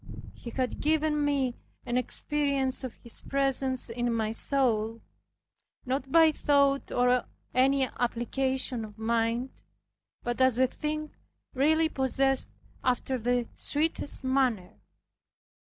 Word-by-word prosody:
He 240 Hz, -, -9 dB
had 255 Hz, +1 st, -2 dB
given 305 Hz, 0 st, +1 dB
me 275 Hz, -4 st, 0 dB, 0.3 s
an 240 Hz, -, -2 dB
experience 275 Hz, +1 st, 0 dB
of 255 Hz, -3 st, -5 dB
His 235 Hz, -, -3 dB
presence 270 Hz, -1 st, 0 dB
in 240 Hz, +1 st, -1 dB
my 220 Hz, -2 st, 0 dB
soul; 225 Hz, -3 st, 0 dB, 0.9 s
not 265 Hz, +1 st, -2 dB
by 325 Hz, -1 st, +6 dB
thought 280 Hz, -2 st, +2 dB
or 245 Hz, 0 st, +2 dB, 0.3 s
any 270 Hz, +2 st, +3 dB
application 250 Hz, 0 st, -1 dB
of 210 Hz, -1 st, -10 dB
mind, 230 Hz, +3 st, 0 dB, 0.7 s
but 240 Hz, +1 st, -2 dB
as 260 Hz, -2 st, +5 dB
a 260 Hz, -, +5 dB
thing 305 Hz, +3 st, -4 dB, 0.4 s
really 315 Hz, +4 st, +3 dB
possessed 270 Hz, -1 st, +1 dB, 0.3 s
after 255 Hz, +1 st, 0 dB
the 245 Hz, +1 st, 0 dB
sweetest 295 Hz, -2 st, 0 dB
manner. 260 Hz, -8 st, +1 dB
260 Hz, 115 wpm, -28 LUFS, 240-275 Hz, 0.9 s, by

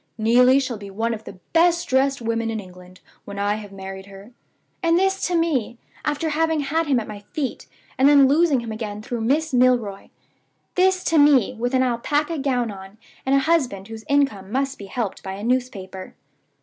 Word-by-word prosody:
'Neelie 250 Hz, +4 st, +5 dB
shall 255 Hz, -5 st, -3 dB
be 200 Hz, -1 st, -9 dB
one 225 Hz, +4 st, -2 dB
of 220 Hz, -1 st, -8 dB
the 195 Hz, -, -10 dB, 0.2 s
best 340 Hz, +1 st, +3 dB
dressed 265 Hz, 0 st, +1 dB
women 230 Hz, 0 st, -1 dB
in 220 Hz, -1 st, -3 dB
England 180 Hz, -1 st, -13 dB, 0.2 s
when 200 Hz, 0 st, -9 dB
I 205 Hz, +1 st, +1 dB
have 205 Hz, -2 st, -9 dB
married 190 Hz, 0 st, -8 dB
her.' 200 Hz, +3 st, -13 dB, 0.5 s
And 335 Hz, -1 st, +3 dB
this 385 Hz, +1 st, +1 dB
to 360 Hz, -, -1 dB
me, 290 Hz, -9 st, 0 dB, 0.3 s
after 300 Hz, +2 st, -1 dB
having 320 Hz, 0 st, +1 dB
had 320 Hz, +3 st, -1 dB
him 270 Hz, -4 st, +3 dB
at 220 Hz, -, -6 dB
my 210 Hz, -1 st, -7 dB
feet, 280 Hz, -4 st, -3 dB, 0.3 s
and 270 Hz, +2 st, +6 dB
then 280 Hz, -2 st, +7 dB
losing 295 Hz, -2 st, +3 dB
him 230 Hz, -1 st, -6 dB
again 215 Hz, -1 st, -5 dB
through 240 Hz, 0 st, -4 dB
Miss 290 Hz, +6 st, 0 dB
Milroy! 245 Hz, -6 st, +2 dB, 0.6 s
This 370 Hz, 0 st, +2 dB
to 325 Hz, -2 st, +2 dB
me, 280 Hz, -6 st, +5 dB
with 245 Hz, +2 st, -2 dB
an 260 Hz, -, +3 dB
alpaca 290 Hz, +6 st, 0 dB
gown 250 Hz, -5 st, 0 dB
on, 195 Hz, +1 st, -11 dB, 0.3 s
and 270 Hz, -, +4 dB
a 275 Hz, -, +4 dB
husband 260 Hz, -11 st, 0 dB
whose 225 Hz, 0 st, -8 dB
income 275 Hz, -9 st, +1 dB
must 270 Hz, +2 st, -1 dB
be 200 Hz, -, -8 dB
helped 215 Hz, 0 st, -4 dB
by 190 Hz, -, -6 dB
a 200 Hz, +2 st, -7 dB
newspaper! 215 Hz, -7 st, -3 dB
245 Hz, 195 wpm, -22 LUFS, 210-290 Hz, 0.6 s, then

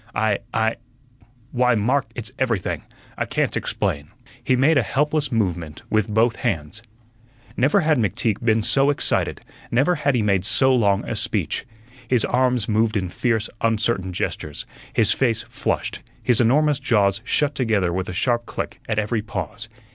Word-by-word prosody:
I 110 Hz, -2 st, +1 dB
I 110 Hz, 0 st, 0 dB, 0.7 s
why, 125 Hz, -1 st, +3 dB
Mark, 125 Hz, +6 st, +1 dB
it's 110 Hz, -4 st, -5 dB
everything 115 Hz, -8 st, -1 dB, 0.4 s
I -, -, 0 dB
can't -, -, -1 dB
explain." 70 Hz, +1 st, -2 dB, 0.3 s
He 130 Hz, -, +2 dB
made 140 Hz, +4 st, +4 dB
a -, -, +4 dB
helpless 150 Hz, +4 st, 0 dB
movement 85 Hz, -9 st, -2 dB
with 110 Hz, 0 st, +1 dB
both 115 Hz, +2 st, +2 dB
hands. 100 Hz, -3 st, -3 dB, 0.7 s
Never 145 Hz, +11 st, +3 dB
had 155 Hz, -4 st, +2 dB
McTeague 105 Hz, +1 st, -1 dB
been 110 Hz, -1 st, +2 dB
so 135 Hz, +5 st, +3 dB
excited; 145 Hz, -, 0 dB, 0.3 s
never 135 Hz, +9 st, +3 dB
had 145 Hz, -5 st, 0 dB
he 115 Hz, -, +1 dB
made 100 Hz, -3 st, +2 dB
so 130 Hz, +6 st, +4 dB
long 100 Hz, -5 st, +2 dB
a -, -, -2 dB
speech. -, -, -2 dB, 0.4 s
His 120 Hz, -2 st, +2 dB
arms 125 Hz, -3 st, +1 dB
moved 110 Hz, 0 st, +1 dB
in 95 Hz, -2 st, -2 dB
fierce, 115 Hz, +3 st, 0 dB
uncertain 110 Hz, -4 st, 0 dB
gestures, 75 Hz, -4 st, -4 dB, 0.3 s
his -, -, +3 dB
face 120 Hz, -4 st, +1 dB
flushed, -, -, -2 dB, 0.2 s
his 120 Hz, -2 st, +4 dB
enormous 145 Hz, +4 st, +3 dB
jaws 100 Hz, -3 st, +2 dB
shut 145 Hz, +3 st, +1 dB
together 110 Hz, -10 st, 0 dB
with 95 Hz, +1 st, -2 dB
a -, -, -4 dB
sharp 120 Hz, +5 st, 0 dB
click -, -, -5 dB
at 110 Hz, -, 0 dB
every 105 Hz, +1 st, 0 dB
pause. 105 Hz, +2 st, -6 dB
115 Hz, 160 wpm, -22 LUFS, 105-130 Hz, 0.7 s, made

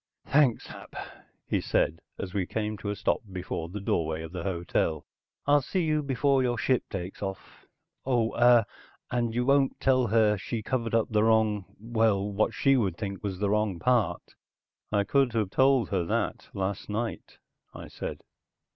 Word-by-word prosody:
"Thanks, 140 Hz, -4 st, +3 dB
Hap," -, -, -11 dB, 0.5 s
he -, -, 0 dB
said 80 Hz, -, +1 dB, 0.2 s
as 95 Hz, -1 st, -6 dB
we 95 Hz, -3 st, -1 dB
came 110 Hz, -1 st, -2 dB
to 105 Hz, -, -4 dB
a 105 Hz, -, -1 dB
stop -, -, 0 dB
before 90 Hz, -3 st, -4 dB
the 105 Hz, +4 st, -5 dB
doorway 80 Hz, -4 st, -1 dB
of 80 Hz, -, -8 dB
the 90 Hz, -1 st, -5 dB
hotel. 85 Hz, -3 st, -1 dB, 0.4 s
"I'll 145 Hz, 0 st, +5 dB
see 180 Hz, +7 st, -1 dB
you 155 Hz, -1 st, +1 dB
before 140 Hz, 0 st, +2 dB
your 120 Hz, -1 st, 0 dB
ship 130 Hz, 0 st, +2 dB
takes 95 Hz, -1 st, -6 dB
off. 95 Hz, -1 st, -7 dB, 0.4 s
Oh 120 Hz, -4 st, +1 dB
ah 120 Hz, -2 st, +6 dB, 0.5 s
you 120 Hz, 0 st, 0 dB
won't 140 Hz, 0 st, +3 dB
tell 130 Hz, -2 st, +3 dB
her 110 Hz, -1 st, +3 dB
she 110 Hz, +5 st, -4 dB
covered 115 Hz, -2 st, -1 dB
up 115 Hz, -, +2 dB
the 105 Hz, -1 st, +3 dB
wrong 110 Hz, -3 st, +3 dB
well 110 Hz, -3 st, +1 dB
what 110 Hz, +2 st, +2 dB
she 135 Hz, -1 st, +3 dB
would 100 Hz, -9 st, 0 dB
think 100 Hz, -3 st, -5 dB
was 100 Hz, -3 st, -3 dB
the 100 Hz, +1 st, 0 dB
wrong 105 Hz, -3 st, +1 dB
part?" 110 Hz, -5 st, 0 dB, 0.6 s
"I 100 Hz, -1 st, +2 dB
could 135 Hz, +1 st, +2 dB
have 105 Hz, -4 st, 0 dB
told 135 Hz, -1 st, +3 dB
her 95 Hz, -3 st, 0 dB
that 85 Hz, -, -2 dB
last 95 Hz, +1 st, -3 dB
night," 110 Hz, +2 st, -4 dB, 0.4 s
I -, -, -8 dB
said. -, -, -6 dB
110 Hz, 175 wpm, -28 LUFS, 95-125 Hz, 0.6 s, ah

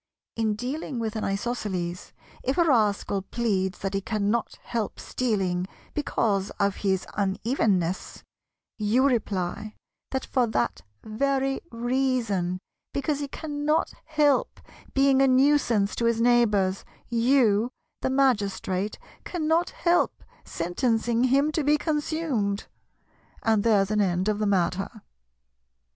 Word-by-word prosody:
In 220 Hz, -2 st, 0 dB
dealing 260 Hz, +4 st, -4 dB
with 225 Hz, -1 st, -2 dB
an 220 Hz, -, -2 dB
Isosceles, 195 Hz, -4 st, -3 dB, 0.3 s
if 265 Hz, -, -1 dB
a 345 Hz, -, +5 dB
rascal 210 Hz, -8 st, +2 dB
pleads 195 Hz, -3 st, -1 dB
that 195 Hz, 0 st, -3 dB
he 195 Hz, -, 0 dB
cannot 215 Hz, +2 st, -1 dB
help 230 Hz, -4 st, -3 dB
stealing 190 Hz, -7 st, -1 dB, 0.3 s
because 210 Hz, -9 st, 0 dB
of 200 Hz, -1 st, +1 dB
his 190 Hz, -2 st, 0 dB
unevenness, 195 Hz, -3 st, 0 dB, 0.6 s
you 220 Hz, +5 st, +3 dB
reply 215 Hz, -5 st, -1 dB, 0.3 s
that 265 Hz, 0 st, -2 dB
for 250 Hz, -2 st, +1 dB
that 95 Hz, -, -1 dB, 0.2 s
very 270 Hz, +4 st, 0 dB
reason, 235 Hz, -7 st, 0 dB, 0.4 s
because 280 Hz, +1 st, 0 dB
he 285 Hz, -, -3 dB
cannot 300 Hz, +1 st, -1 dB
help 295 Hz, -3 st, +2 dB, 0.4 s
being 270 Hz, 0 st, +4 dB
a 270 Hz, -, +5 dB
nuisance 255 Hz, -6 st, +3 dB
to 235 Hz, -, 0 dB
his 230 Hz, -1 st, +2 dB
neighbours, 210 Hz, -6 st, +3 dB, 0.2 s
you, 235 Hz, -2 st, +3 dB, 0.3 s
the -, -, 0 dB
Magistrate, 205 Hz, -7 st, +1 dB, 0.3 s
cannot 330 Hz, 0 st, 0 dB
help 350 Hz, 0 st, +1 dB, 0.2 s
sentencing 230 Hz, +7 st, 0 dB
him 275 Hz, +4 st, +3 dB
to 310 Hz, 0 st, 0 dB
be 295 Hz, +1 st, +4 dB
consumed—and 260 Hz, -7 st, -2 dB
there's 205 Hz, -3 st, +3 dB
an 210 Hz, 0 st, +2 dB
end 185 Hz, 0 st, +1 dB
of 210 Hz, -1 st, +1 dB
the 210 Hz, -, +1 dB
matter. 195 Hz, +3 st, 0 dB
230 Hz, 120 wpm, -26 LUFS, 200-270 Hz, 0.6 s, a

